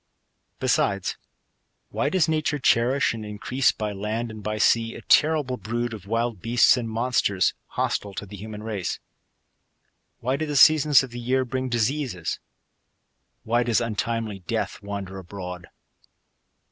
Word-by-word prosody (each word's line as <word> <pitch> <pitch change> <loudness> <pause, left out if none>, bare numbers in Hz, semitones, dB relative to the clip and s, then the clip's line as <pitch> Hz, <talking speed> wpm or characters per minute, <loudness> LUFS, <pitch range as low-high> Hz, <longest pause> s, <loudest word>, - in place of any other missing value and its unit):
Besides, 100 -1 +1 0.7
why 140 - 0
does 170 0 +2
nature 155 -2 0
cherish 130 0 +3
and 110 -2 -6
increase, 105 +5 0
by 105 -1 -4
land 110 +4 -3
and 110 -1 -9
by 105 +1 -3
sea, 115 +2 +2
a - - -10
terrible 150 -5 +3
brood 120 +3 -3
of 100 -3 -9
wild 115 -2 -1
beasts 120 +2 +5
and 120 -3 -3
monsters^ 110 -5 +1
hostile 100 -1 -2
to - - -5
the 100 +1 -10
human 105 +1 -8
race? 105 -5 -3 1.2
Why 130 +3 -1
do 155 +1 -2
the 145 - -3
seasons 150 0 +6
of 130 - -7
the 120 - -6
year 130 +2 +1
bring 130 +1 -3
dis 120 0 +2
eases? 130 - -3 1.0
Why 120 +2 +2
does 120 -2 +2
untimely 115 -2 -2
death 90 - -3
wander 100 -1 -6
abroad 90 -2 -8
115 Hz, 145 wpm, -25 LUFS, 105-130 Hz, 1.2 s, seasons